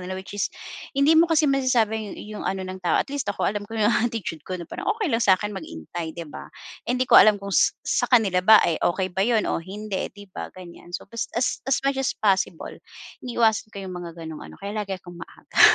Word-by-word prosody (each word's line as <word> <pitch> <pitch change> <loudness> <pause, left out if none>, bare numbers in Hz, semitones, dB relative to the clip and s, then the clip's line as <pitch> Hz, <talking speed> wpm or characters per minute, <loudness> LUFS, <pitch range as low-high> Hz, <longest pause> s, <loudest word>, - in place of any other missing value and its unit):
kanila, 185 +1 -5
which 190 +1 -8
is 205 -1 -1 0.5
hindi 280 +3 +5
mo 325 +1 +5
kasi 320 -1 +3
masasabi 235 -7 +1
yu 210 0 -8
yung - - -6
ano 190 -1 -2
ng 185 0 -7
tao, 180 - +1
at 280 - -1
least 280 -7 -3
ako, 205 - -1
alam 205 +1 0
ko 225 - -6
'yong 215 +1 +3
attitude 225 -9 -1
ko, 185 - -2
na 170 - -7
parang 390 - -6
okey 415 - -1
lang 230 - +2
sa 190 -3 +5
akin 210 +2 -4
maghintay, 160 - -7
'di 170 - -5
ba? 150 - -10 0.4
Eh, 250 - +1
hindi 255 - +1
ko - - -5
alam 215 -1 +6
kung 200 0 -7
s - - +3
sa - - +1
kanila 210 -7 +4
ba, 215 +4 +8
eh, 165 - 0
okey 185 +1 0
ba 190 - -2
'yon 220 0 +2
o - - -1
hindi, 195 +2 -4
'di 205 -2 -15
ba, - - -6
ganyan. 175 -1 -9
So, - - -12
as 230 - -3
as 245 - 0
as 270 - +3
much 275 -1 +1
as 270 - -1
possible, 195 -5 0 0.5
iniiwasan 225 -3 +1
ko 200 -2 -8
'yung 185 - -6
mga 175 -2 -7
gano'ng 160 -2 -7
ano, - - -11
kaya 200 +1 -6
lagi 195 -2 -3
'kong 175 -1 -12
maaga. - - -5
205 Hz, 245 wpm, -24 LUFS, 185-230 Hz, 0.5 s, ba